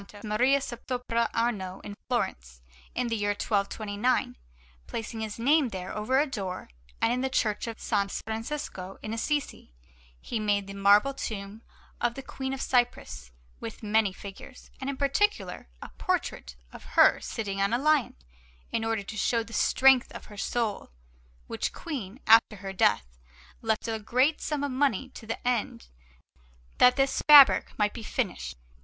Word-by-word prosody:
Maria 240 +6 +3
sopra 240 -2 -2
Arno 200 -5 -1
in 205 - -7
Florence, - - -3 0.3
in 250 0 0
the 230 - 0
year 205 -1 0
1229, 205 +3 0 0.5
placing 225 0 -5
his 215 -1 -4
name 275 +3 +3
there, 185 -2 -6
over 215 +6 +1
a 295 - +3
door, 195 - -5 0.3
and 230 - +2
in 250 - -1
the 265 - 0
Church 215 -4 0
of 225 -1 -5
S. 200 -1 -1
Francesco 220 -5 -5
in 215 - -4
Assisi 250 - -3 0.4
he 225 - -4
made 205 -2 +1
the 195 - -8
marble 205 +7 +4
tomb 210 -4 -6 0.4
of 240 0 +1
the 270 - -7
Queen 265 0 -5
of 270 0 -3
Cyprus, 70 - 0 0.3
with 115 - -8
many 215 -1 +2
figures, 200 +6 -11
and 265 0 -4
in 280 - -4
particular 275 - 0
a - - -9
portrait 60 - -2 0.2
of - - -11
her - - +7
sitting 195 -3 -4
on 200 - +2
a 240 - +2
lion, 300 +1 +2 0.6
in 225 - -1
order 225 -2 -1
to 220 - -8
show 230 +2 +1
the 230 - -13
strength 265 0 +4
of - - -9
her - - -12
soul; 220 +1 -2 0.6
which - - -3
Queen, 250 - -6
after 225 0 +6
her 195 0 -7
death, 120 - +3 0.6
left 220 0 -1
a 225 -1 -2
great 255 +8 +1
sum 295 -2 -2
of 285 - -1
money 265 -2 0
to 225 -3 -12
the 230 +2 -4
end 225 - -1 0.9
that 250 - +7
this 270 -1 +1
fabric 290 -3 +8
might 210 -1 +1
be 235 - -7
finished. - - -3
225 Hz, 160 wpm, -28 LUFS, 200-255 Hz, 0.9 s, fabric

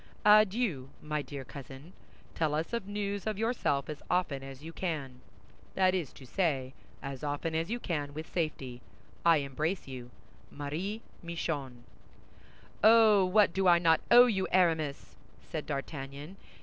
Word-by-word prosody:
"Adieu, 210 - +4
my 150 0 -2
dear 140 -2 -7
cousin. 140 +5 -10 0.4
Tell 155 -2 0
us 160 +8 -2
news 205 0 -3
of 215 -2 -1
yourself 220 - 0
as 150 -2 -6
often 180 -6 0
as 135 +1 -10
you 165 +1 -8
can; 140 -9 -4 0.5
that 185 -1 +4
is 175 -8 -2
to 135 - -13
say, 135 -5 -1 0.3
as 140 -1 -6
often 145 +2 -2
as 165 +3 -1
you 240 +2 -2
can 145 -8 -3
with 155 +1 -5
safety. 135 -8 -3 0.4
I 170 -1 +6
embrace 150 +6 -2
you. 125 -2 -8 0.4
"MARIE 170 +10 -4 0.2
MICHON" 145 -7 -4 1.0
"Oh, 220 -2 +7
what 195 -1 +4
do 190 -1 +1
I 175 -1 +7
not 165 -1 +3
owe 245 +1 +9
you, 195 -6 0
Aramis?" 160 -6 +1 0.2
said - - -6
D'Artagnan. 140 +4 -6
160 Hz, 145 wpm, -31 LUFS, 140-190 Hz, 1.0 s, owe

